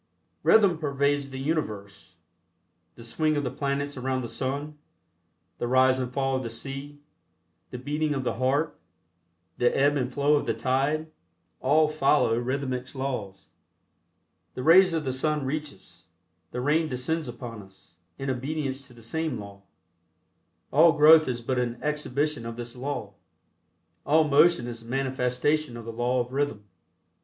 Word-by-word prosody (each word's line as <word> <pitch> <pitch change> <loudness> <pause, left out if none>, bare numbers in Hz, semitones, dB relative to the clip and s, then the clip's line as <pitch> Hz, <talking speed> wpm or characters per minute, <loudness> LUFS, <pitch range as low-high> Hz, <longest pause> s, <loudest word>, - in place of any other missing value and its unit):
Rhythm 195 -7 +5
pervades 140 -1 0
the 135 - -7
universe. 105 - -4 0.8
The 115 - -12
swing 155 +6 0
of 145 - 0
the 125 - -2
planets 140 0 -2
around 130 0 -2
the - - -4
sun; 145 +4 -4 0.8
the 120 - -1
rise 130 +1 +4
and 125 -1 -3
fall 135 0 0
of 130 - -1
the 115 - -5
sea; 135 +5 -7 0.7
the 125 - -6
beating 150 +3 -1
of 135 - -2
the - - -1
heart; 135 +5 0 0.8
the 120 - +4
ebb 145 +1 +3
and 130 -1 -2
flow 140 +3 +2
of - - -3
the - - 0
tide; 145 +5 0 0.5
all 155 +4 +4
follow 150 -5 +2
rhythmics 130 +1 -3
laws. 115 -8 -5 1.1
The 125 - -4
rays 175 +3 +6
of 160 - -1
the 130 -2 -2
sun 150 +2 0
reach 150 +2 -3
us; 95 - -16 0.4
the 125 - -4
rain 155 +4 +1
descends 140 +5 -2
upon 120 -2 -7
us, 95 -3 -18 0.2
in 135 0 -2
obedience 135 +1 -3
to 125 - -16
the 115 - -14
same 160 +2 -2
law. 100 -1 -10 1.1
All 160 +3 +6
growth 155 0 +7
is 120 -2 -3
but 130 +1 -1
an 120 -1 -2
exhibition 150 -3 -1
of 115 - -6
this 120 0 -7
law. 125 -6 -4 0.9
All 155 +2 +4
motion 150 -2 +4
is 120 -1 -7
a - - -16
manifestation 130 +2 0
of 115 - -9
the 115 - -6
law 120 +2 +1
of 120 +1 -7
rhythm. 140 -7 -1
135 Hz, 160 wpm, -26 LUFS, 125-150 Hz, 1.1 s, growth